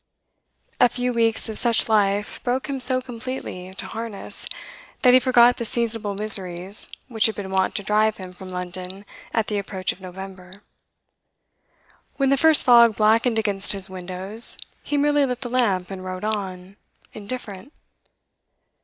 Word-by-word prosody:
A 245 - +6
few 245 +1 -2
weeks 225 -1 +2
of 220 -1 -2
such 235 -2 +3
life 205 -1 +1
broke 255 +1 -1
him 275 -2 -4
so 255 0 +3
completely 240 -7 -7
to - - -7
harness, 225 -2 -5 0.6
that 250 -1 +7
he 255 - +8
forgot 245 -1 +5
the - - -3
seasonable 225 -3 -2
miseries 195 -2 0 0.2
which 230 -4 +2
had 220 - -4
been 195 -2 -6
wont 190 0 +1
to 200 - -3
drive 215 +1 +2
him 185 -1 -7
from 185 +1 -11
London 180 +2 -7 0.3
at 225 -2 0
the 210 -2 -2
approach 190 -2 -3
of 185 - -12
November. 190 +1 -10 1.5
When 275 -1 +2
the 275 - +4
first 315 +2 +5
fog 235 -3 +7
blackened 225 +2 +3
against 205 -3 0
his 195 -1 -6
windows, 190 +4 -1 0.2
he 290 - -2
merely 290 0 +3
lit 250 -2 -2
the 245 - -5
lamp 200 -8 0
and 190 -1 -6
wrote 185 0 -6
on, 195 -3 -4 0.4
indifferent. 210 +1 -7
215 Hz, 155 wpm, -23 LUFS, 190-245 Hz, 1.5 s, he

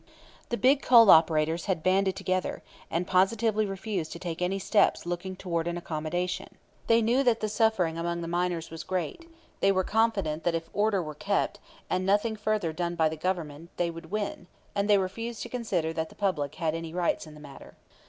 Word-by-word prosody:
The 235 - -1
big 270 +3 +4
coal 230 -4 +8
operators 160 0 +4
had 180 -5 -1
banded 190 0 +2
together, 185 -1 -2 0.3
and 170 +2 -1
positively 210 +3 +2
refused 195 -3 -4
to - - -7
take 170 -1 -5
any 180 +2 0
steps 195 0 +2
looking 175 +2 -4
toward 170 -3 -2
an 175 0 -2
accommodation. 175 +3 -3 0.3
They 230 0 +4
knew 240 +4 +3
that 240 -4 +2
the 215 - -1
suffering 205 -7 +1
among 170 0 -2
the 165 - -4
miners 175 -1 -1
was 165 0 -6
great; 190 - -4 0.3
they 195 - +4
were 190 -1 +1
confident 195 -8 0
that 170 0 +1
if 165 0 -5
order 205 -3 +1
were 155 -1 -6
kept, 200 +7 -1 0.3
and 185 - 0
nothing 205 +4 +2
further 210 -6 -1
done 175 +1 -2
by 160 -2 +3
the 160 - -5
Government, 165 -2 -3
they 170 -1 0
would 165 -1 -10
win; 205 -3 -3 0.3
and 200 0 -1
they 205 - +6
refused 225 +5 -3
to 240 - -7
consider 195 -10 -1
that 160 0 -3
the - - -16
public 155 -8 -1
had 160 -3 -1
any 165 0 -5
rights 175 -2 0
in 155 - -12
the - - -12
matter. 140 -2 -12
180 Hz, 200 wpm, -28 LUFS, 165-205 Hz, 0.3 s, coal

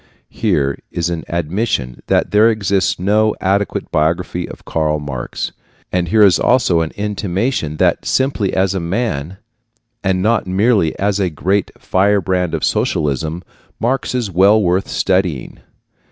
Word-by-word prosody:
Here 70 -1 0
is 85 0 -2
an 85 -2 -3
admission 85 - -2
that - - +1
there 105 +2 +5
exists 100 -2 0
no 105 +3 +2
adequate 100 +2 -1
biography 85 +3 0
of - - -12
Karl 75 -1 0
Marx, 70 -4 -5 0.4
and 90 -1 0
here 105 +5 +4
is 95 -4 +5
also 115 -10 +3
an 80 - -2
intimation 100 - -2
that - - +2
simply 130 -7 0
as 95 0 +1
a 95 - -1
man, 90 - -2 0.7
and 95 -1 +1
not 110 -2 +1
merely 95 -3 +2
as 100 0 0
a 95 -2 +1
great 95 +6 0
firebrand 95 -2 +1
of - - -4
socialism, 80 +4 -1 0.4
Marx 130 +2 -1
is 120 -6 -1
well 100 +5 +5
worth 95 -1 +1
studying. 90 -8 -1
95 Hz, 140 wpm, -17 LUFS, 85-105 Hz, 0.7 s, there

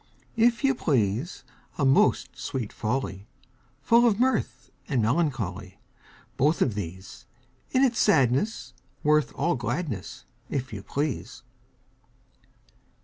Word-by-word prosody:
If 235 +3 +3
you 270 0 +4
please, 130 - -1 0.3
A 140 - +1
most 135 +1 +3
sweet 120 -6 -4
folly! 110 -4 -3 0.6
Full 235 +7 +5
of 215 -2 +1
mirth 260 +1 0 0.2
and 135 -5 0
melancholy: 110 - -1 0.6
Both 150 +5 +3
of 120 - 0
these! 95 -1 -8 0.4
In 260 - +2
its 240 -4 +2
sadness 135 - +2 0.3
worth 150 0 +3
all 175 - +1
gladness, 120 - -4 0.2
If 130 -4 -3
you 100 - -5
please! 130 - -4
135 Hz, 110 wpm, -26 LUFS, 110-180 Hz, 0.6 s, Full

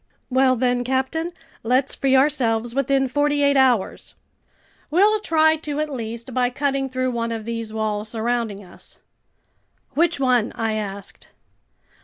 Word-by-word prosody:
"Well 260 0 +4
then, 245 0 +1
captain, 265 +6 -1 0.3
let's 255 +4 +1
free 270 -1 +1
ourselves 240 -5 +2
within 275 0 +1
forty 290 +2 +1
eight 280 0 +3
hours!" 255 -7 +1 0.7
"We'll 410 +7 +4
try 315 -4 +3
to 300 -2 -4
at 305 -1 -2
least, 235 +1 -6
by 250 0 +2
cutting 275 +1 -1
through 255 0 -1
one 230 -1 -2
of 225 -2 -4
these 230 -1 -4
walls 215 -1 -2
surrounding 225 -2 -2
us." 180 - -15 1.0
"Which 320 +1 +2
one?" 250 -4 +2
I 225 -1 -1
asked. 200 -2 -6
255 Hz, 140 wpm, -22 LUFS, 230-280 Hz, 1.0 s, Well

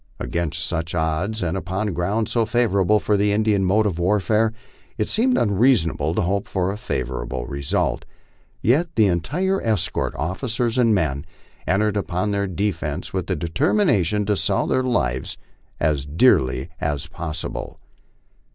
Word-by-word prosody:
Against 80 +4 -2
such 85 -1 -3
odds, 85 +7 -1
and 85 0 -1
upon 95 +2 -2
ground 100 +6 0
so 115 - +1
favorable 105 -3 +2
for 105 - +1
the 100 +1 +2
Indian 105 -1 +2
mode 105 +4 +3
of 90 -5 -1
warfare, 105 +4 +2 0.5
it 105 - 0
seemed 250 +4 +2
unreasonable 100 - +2
to - - +1
hope 100 +3 -1
for 95 0 -1
a 100 - -5
favorable 65 - -3
result. 70 0 -1 0.6
Yet 145 +10 +3
the 110 - +5
entire 150 - 0
escort, 110 -6 -1
officers 115 - -1
and 115 -3 +4
men, 75 -6 0 0.4
entered 105 +2 +2
upon 100 +1 -1
their 100 0 0
defence 90 -4 -3
with 95 -2 -2
the 95 - 0
deter 85 - 0
mination 105 - +2
to 105 +1 +1
sell - - +1
their 130 - +1
lives 65 - -1 0.4
as 75 -3 0
dearly 75 - +3
as 75 -1 -1
possible. 80 -3 -5
95 Hz, 150 wpm, -22 LUFS, 80-110 Hz, 0.6 s, the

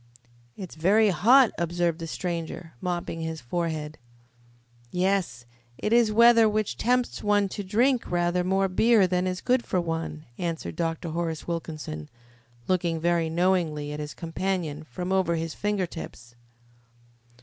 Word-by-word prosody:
"It's 185 -4 -7
very 205 +7 +3
hot," 230 - +5
observed 170 -1 0
the 165 - -5
stranger, 165 -1 -5
mopping 175 -2 -3
his 160 0 -4
forehead. 155 +2 -3 0.9
"Yes, 180 -10 0 0.3
it 210 - -1
is 235 -2 +4
weather 230 0 +6
which 215 -1 -1
tempts 250 +1 0
one 205 -1 +3
to 205 - -5
drink 235 +6 +1
rather 175 0 +1
more 195 +1 +1
beer 215 +2 +4
than 180 0 0
is 185 0 -3
good 250 -1 +2
for 185 - -1
one," 165 -2 -4
answered 165 -3 -3
Dr. 165 0 -2
Horace 165 -1 -3
Wilkinson, 155 - -5 0.6
looking 170 -3 0
very 170 0 +1
knowingly 165 -4 0
at 150 - -5
his 150 0 -6
companion 165 -3 -3
from 180 +7 -5
over 185 -3 +2
his 165 -1 -3
finger 205 -2 -1
tips. 120 -8 -9
175 Hz, 140 wpm, -26 LUFS, 160-195 Hz, 0.9 s, weather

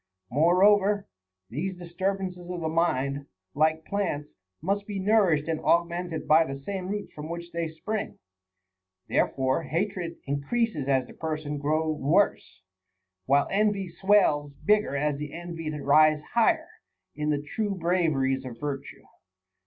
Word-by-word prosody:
6. - - -38
Moreover, 195 +5 +4 0.4
these 180 +9 -3
disturbances 180 0 -3
of 180 -1 -4
the 160 - -1
mind, 140 -4 0 0.3
like 160 +2 +1
plants, 170 -8 -2 0.3
must 200 +4 -1
be 205 -2 -4
nourished 190 -7 +3
and 160 -1 -1
augmented 170 -1 0
by 160 +2 +6
the 135 -3 -6
same 185 +5 -5
roots 205 +1 -4
from 150 +1 -7
which 170 0 -6
they 170 -1 -2
spring; 200 +7 -4 0.9
therefore 130 +3 +1
hatred 175 0 -2
increases 145 - -1
as 135 -2 +2
the - - -13
per 160 -1 -3
sons 150 -1 -8
hated 145 -1 -3
grow 155 +2 +1
worse, 155 - +1 0.6
while 140 +2 +4
envy 200 -2 +1
swells 170 -6 +3
bigger 210 -8 +3
as 145 0 0
the 150 -1 -5
envied 165 -3 -5
rise 150 +2 +4
higher 315 +8 +3 0.4
in 150 0 -2
the 145 -1 0
true 210 -3 -1
braveries 160 -7 +1
of 120 -3 -8
virtue. 145 -2 -5
165 Hz, 145 wpm, -27 LUFS, 150-190 Hz, 0.9 s, by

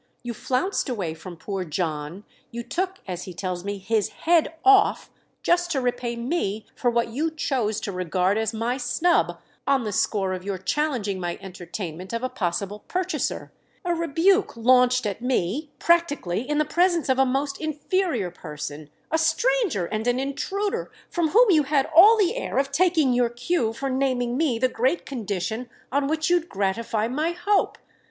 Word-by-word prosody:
You 240 -1 -4
flounced 265 - -1
away 190 -10 -2
from 170 +2 -10
poor 195 +2 -4
John, 160 +1 -3 0.3
you 235 -1 -6
took, 370 +7 -2
as 180 -1 -5
he 185 - -9
tells 180 -1 -3
me, 200 0 -3
'his 210 +1 0
head 330 -1 +2
off,' 405 +1 +5 0.3
just 350 0 +2
to 275 - +1
repay 245 -1 -1
me 235 - -2
for 245 - +1
what 235 -1 +1
you 295 +8 -1
chose 255 -9 -1
to 205 - -3
regard 185 +1 0
as 220 -1 0
my 230 +3 -1
snub 245 - +1 0.3
on 275 -2 +3
the 215 - -3
score 195 -1 0
of 185 0 -5
your 195 -1 -3
challenging 210 - -1
my 175 -1 -3
entertainment 180 -1 -7
of 230 +1 -2
a 255 - 0
possible 195 +2 -2
purchaser; 370 0 -2 0.3
a 350 - +1
rebuke 335 - +2
launched 250 +1 +4
at 205 +2 -3
me, 250 - -1
practically, 290 - +1
in 295 - +1
the 305 - +3
presence 345 0 +2
of 260 -1 +2
a - - +7
most 275 +2 -1
inferior 310 - -1
person, 150 -3 -7 0.2
a 320 - +2
stranger 435 - +1
and 215 +5 -3
an 245 +1 +2
intruder, 380 +10 -2 0.2
from 340 -2 +1
whom 435 +6 +5
you 315 -4 +5
had 280 -1 +1
all 415 +7 +9
the 405 +1 +2
air - - -3
of 275 0 +1
taking 320 -4 +3
your 245 -1 +2
cue 240 +1 0
for 250 +5 -4
naming 255 -2 0
me 275 -5 +1
the 255 +3 +3
great 255 +7 0
condition 220 -1 -3 0.2
on 280 0 +1
which 315 +1 0
you'd 350 -1 +2
gratify 210 +3 -1
my 305 +7 -1
hope. 395 +4 +1
250 Hz, 175 wpm, -24 LUFS, 200-315 Hz, 0.3 s, all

